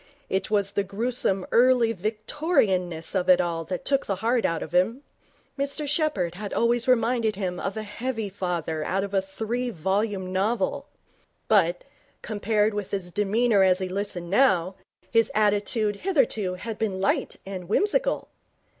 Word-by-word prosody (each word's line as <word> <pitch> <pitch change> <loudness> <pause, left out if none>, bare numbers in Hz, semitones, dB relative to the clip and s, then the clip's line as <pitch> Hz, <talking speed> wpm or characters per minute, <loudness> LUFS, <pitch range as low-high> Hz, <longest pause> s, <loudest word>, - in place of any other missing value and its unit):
It 190 - 0
was 200 -2 +1
the 200 - 0
gruesome 195 -1 0
Early 240 -1 +4
Victorianness 210 - -1
of 185 -2 0
it 180 -1 +7
all 170 -2 -1
that 180 +2 -5
took 275 -1 +1
the 195 - 0
heart 230 +5 +1
out 165 -1 0
of - - -9
him. 225 +10 +2 0.6
Mr 280 +1 0
Sheppherd 290 - 0
had 200 +2 -6
always 235 +1 +2
reminded 230 -3 +2
him 185 -2 -3
of 195 +2 -3
a 215 - -3
heavy 225 +1 -4
father 175 -5 -3
out 195 +5 -1
of 200 0 -6
a 195 - +3
three 225 +6 -3
volume 190 0 -1
novel, 210 +5 0 0.6
but, 175 -5 +3 0.4
compared 215 0 0
with 205 -2 -4
his 185 -3 -3
demeanour 210 +2 +2
as 185 -1 +5
he 185 0 -3
listened 185 -3 -3
now, 190 -6 +3 0.4
his 230 -1 +3
attitude 210 0 +1
hitherto 230 - 0
had 220 +4 -6
been 200 -4 -1
light 195 - 0
and 185 -2 -7
whimsical. - - +1
205 Hz, 155 wpm, -25 LUFS, 185-230 Hz, 0.6 s, it